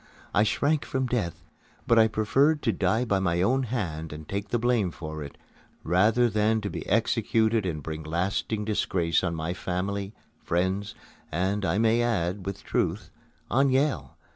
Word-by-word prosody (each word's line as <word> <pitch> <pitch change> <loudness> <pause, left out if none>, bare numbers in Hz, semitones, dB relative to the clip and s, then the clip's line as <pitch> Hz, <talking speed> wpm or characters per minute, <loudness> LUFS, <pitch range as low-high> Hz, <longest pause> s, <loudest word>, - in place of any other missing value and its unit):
I 100 - +4
shrank 145 +7 +1
from 130 -1 -1
death; 115 -10 -2 0.4
but 115 - +5
I 110 - +6
preferred 135 +8 +2
to 115 - +2
die 105 +5 +1
by 100 -4 +1
my 90 -2 +1
own 130 +6 +2
hand 90 -11 -3
and 75 0 -8
take 100 +1 -4
the 120 - +1
blame 120 -5 +1
for 80 -2 -7
it, 70 -1 -8 0.5
rather 105 +8 +3
than 110 0 +2
to 100 -2 -4
be - - -5
executed 110 -2 +2
and 75 -4 -3
bring 80 +1 -5
lasting 95 +6 -2
disgrace 90 -6 +1
on 85 -2 -1
my 80 +2 -2
family, 95 +3 -3 0.3
friends, 95 +4 -1 0.4
and, 95 +5 0
I 95 - +1
may 115 +1 +3
add 95 -5 -1
with 100 - -5
truth, - - -1 0.4
on 135 +2 +4
Yale. 130 - 0
100 Hz, 165 wpm, -27 LUFS, 85-115 Hz, 0.5 s, I